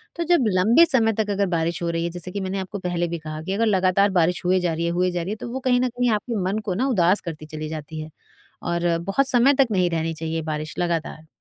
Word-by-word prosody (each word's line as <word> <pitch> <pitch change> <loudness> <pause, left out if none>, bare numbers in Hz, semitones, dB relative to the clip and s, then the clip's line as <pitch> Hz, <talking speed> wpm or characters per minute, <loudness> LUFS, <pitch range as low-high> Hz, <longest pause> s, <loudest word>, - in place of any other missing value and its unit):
तो 340 - -2
जब 335 -6 +3
लंबे 230 - +6
समय 230 -8 +3
तक 215 0 -1
अगर 200 0 +1
बारिश 170 +2 -1
हो 170 - 0
रही 165 0 -1
है, 170 - -1
जैसे 175 +1 -5
कि 200 - -4
मैंने 190 +1 -3
आपको 190 +2 -5
पहले 175 -1 -1
भी 170 0 -4
कहा 155 0 -7
कि 190 - -3
अगर 225 +3 +1
लगातार 195 -1 +3
बारिश 170 +1 +1
हुए 185 +1 +3
जा 175 -2 0
रही 165 +1 -2
है 170 - 0
हुए 180 +1 +1
जा 175 0 -2
रही 170 - -5
है, - - -2
तो 225 - -7
वो 260 - -3
कहीं 250 -1 +2
न 255 - +2
कहीं 245 +1 0
आपके 220 +3 -2 0.2
मन 215 - -1
को 190 - -1
ना 245 +9 0
उदास 190 -6 +3
करती 155 -3 -7
चली 155 0 -6
जाती 155 0 -6
है। 155 - -8 0.5
और 170 -1 0
बहुत 195 +11 0
समय 260 +3 +4
तक 275 0 +4
नहीं 180 -3 +2
रहनी 165 0 -1
चाहिए 160 0 -3
बारिश 155 -1 -4
लगातार। 165 -2 -2
180 Hz, 275 wpm, -23 LUFS, 165-215 Hz, 0.5 s, लंबे